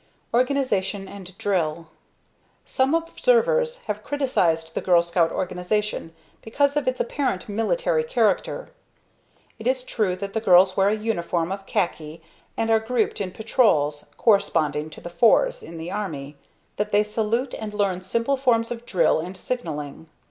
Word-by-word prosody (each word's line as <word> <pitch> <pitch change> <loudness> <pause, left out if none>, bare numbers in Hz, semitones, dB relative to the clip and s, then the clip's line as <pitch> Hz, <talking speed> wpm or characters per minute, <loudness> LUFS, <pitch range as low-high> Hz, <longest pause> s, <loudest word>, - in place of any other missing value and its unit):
Organization 240 -7 0
and 190 -2 -11
Drill. 165 -5 -1 0.8
Some 265 +4 +1
observers 485 +8 +1
have 210 0 -3
criticized 170 - 0
the - - -2
Girl 175 -2 +4
Scout 170 -1 +1
organization 180 -1 -2 0.3
because 280 +5 +1
of 290 -3 0
its 255 0 0
apparent 245 -7 -1
military 470 - 0
character. - - 0 0.9
It 220 - -4
is 255 0 +1
true 210 -7 -1
that 200 +1 -6
the 220 - -1
girls 185 -2 +5
wear 195 0 +3
a 210 - +1
uniform 180 -6 -1
of 195 0 -6
khaki, 160 -3 -2 0.4
and 225 0 0
are 225 - +5
grouped 220 -1 -1
in 190 - -2
Patrols, 170 - +1
corresponding 155 -8 +2
to 155 - -12
the 175 - -7
"fours" - - +3
in 165 - -10
the 165 +2 -6
Army; 155 -9 -5 0.4
that 210 +1 -2
they 205 +1 +4
salute, 225 +4 -1
and 215 -1 -5
learn 200 -3 0
simple 230 +8 0
forms 235 -3 +2
of 240 0 -6
drill 170 -4 +3
and 180 +4 -6
signalling. 160 - -5
210 Hz, 150 wpm, -24 LUFS, 175-250 Hz, 0.9 s, girls